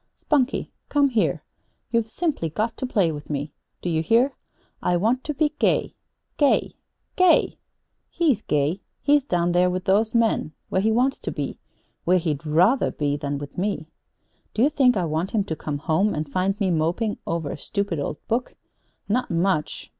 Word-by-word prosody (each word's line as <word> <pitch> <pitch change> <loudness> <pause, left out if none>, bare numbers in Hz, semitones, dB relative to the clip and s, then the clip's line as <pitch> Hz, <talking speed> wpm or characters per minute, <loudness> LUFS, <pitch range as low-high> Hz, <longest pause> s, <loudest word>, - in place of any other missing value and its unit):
"Spunkie, 280 -3 0 0.2
come 285 -1 +3
here! 230 -4 0 0.5
You've 230 -2 +1
simply 290 - -1
got 220 +8 -2
to 260 - -3
play 195 -9 +2
with 150 -1 -8
me. 145 0 -3 0.3
Do 180 - -1
you 160 -1 +1
hear? 235 - +3 0.5
I 175 - +2
want 230 +8 +1
to 300 - -2
be 300 +1 +1
gay - - +2 0.4
gay 290 -2 +2 0.4
GAY! 365 -2 +4 0.5
He's 290 - +1
gay. 150 +4 0 0.2
He's 290 -1 +4
down 175 -8 0
there 180 +1 +3
with 185 +1 -3
those 215 +3 +2
men, 225 -9 +2 0.2
where 190 - +1
he 220 +2 +2
wants 255 +4 +2
to - - -4
be. - - -4 0.4
Where 180 +1 +4
he'd 160 -4 -2
rather 180 - +4
be 145 -1 -1
than 145 -1 -3
be - - -8
with 145 +4 -7
me! 185 -5 -2 0.6
Do 225 - +3
you 290 - +4
think 250 -6 +4
I 180 - +1
want 160 +4 -1
him 205 - +3
to 165 -5 -4
come 150 -1 -4
home 160 +8 +1
and 155 0 -2
find 185 +7 -1
me 195 -3 +1
moping 175 +7 0
over 165 -3 -2
a - - -4
stupid 200 -6 -2
old 145 +1 -3
book? 240 +3 -1 0.5
Not 245 +5 0
much! 170 -2 -1
190 Hz, 185 wpm, -24 LUFS, 160-235 Hz, 0.6 s, GAY